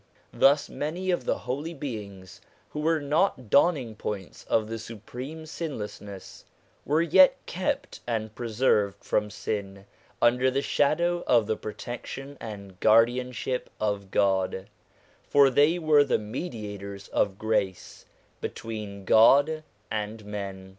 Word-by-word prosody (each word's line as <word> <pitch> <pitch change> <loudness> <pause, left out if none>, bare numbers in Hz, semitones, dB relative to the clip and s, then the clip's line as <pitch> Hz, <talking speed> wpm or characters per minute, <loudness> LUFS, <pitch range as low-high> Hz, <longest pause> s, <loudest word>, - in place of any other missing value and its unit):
Thus 140 +1 +4
many 175 +5 -3
of 175 -8 -1
the - - +1
holy 135 - -4
beings 100 - -7 0.3
who 150 - -5
were 160 +1 +2
not 145 - 0
dawning 140 -7 +3
points 105 -3 -6
of 110 -1 +1
the 115 +1 -5
Supreme 125 +8 -8
Sinless 150 -9 -5
ness, 100 -2 -10 0.4
were 155 +3 +2
yet 185 +3 +6
kept 185 +2 -3
and 110 -2 -2
preserved 110 -3 +1
from 105 0 0
sin 100 -1 -5 0.3
under 125 +2 +4
the 135 +2 -1
shadow 170 +4 +1
of 120 -4 +4
the 110 +1 0
protection 125 +6 -7
and 100 -4 -8
guardianship 125 +3 +2
of 100 -2 -1
God; 95 -1 +1 0.6
for 140 -1 +6
they 145 +6 +4
were 155 -3 +5
the - - +1
mediators 105 - -6
of 95 -2 0
grace 105 -4 -2 0.3
between 105 -3 -6
God 140 +10 +5 0.3
and 110 0 -4
men. 100 -2 -6
115 Hz, 125 wpm, -27 LUFS, 105-145 Hz, 0.6 s, yet